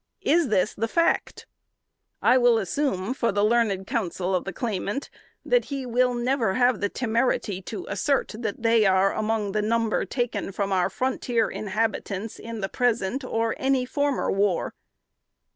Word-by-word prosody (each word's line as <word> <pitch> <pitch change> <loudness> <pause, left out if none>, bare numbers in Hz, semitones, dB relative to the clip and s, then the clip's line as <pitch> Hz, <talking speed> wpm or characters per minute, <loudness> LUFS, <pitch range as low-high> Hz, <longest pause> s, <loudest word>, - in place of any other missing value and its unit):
Is 330 0 +3
this 215 -2 +1
the 225 +2 -2
fact? 335 +8 0 0.8
I 250 - +5
will 245 -2 +5
assume, 220 - -1
for 235 -4 0
the 205 +1 +1
learned 215 -4 +1
counsel 190 - -2
of 180 - 0
the 195 - -3
claimant, 210 +4 -3 0.3
that - - +2
he 275 -2 -4
_will 245 0 +1
never 240 -5 +1
have 245 -3 +2
the 205 - +1
temerity 230 -5 0
to 360 - -6
assert 280 -5 0
that 225 -1 -4
they 230 -2 +4
are 190 +1 +3
among 215 -2 -1
the 210 +1 0
number 225 +1 +1
taken 235 -6 -2
from 200 0 -2
our 185 -2 +2
frontier 245 -3 -1
inhabitants 215 0 -3
in 230 -1 -6
the 195 - -1
present, 240 +3 0
or 225 -2 -1
in - - -13
any 265 -1 +2
former 285 +2 0
war_." 195 -2 +1
225 Hz, 160 wpm, -25 LUFS, 200-250 Hz, 0.8 s, I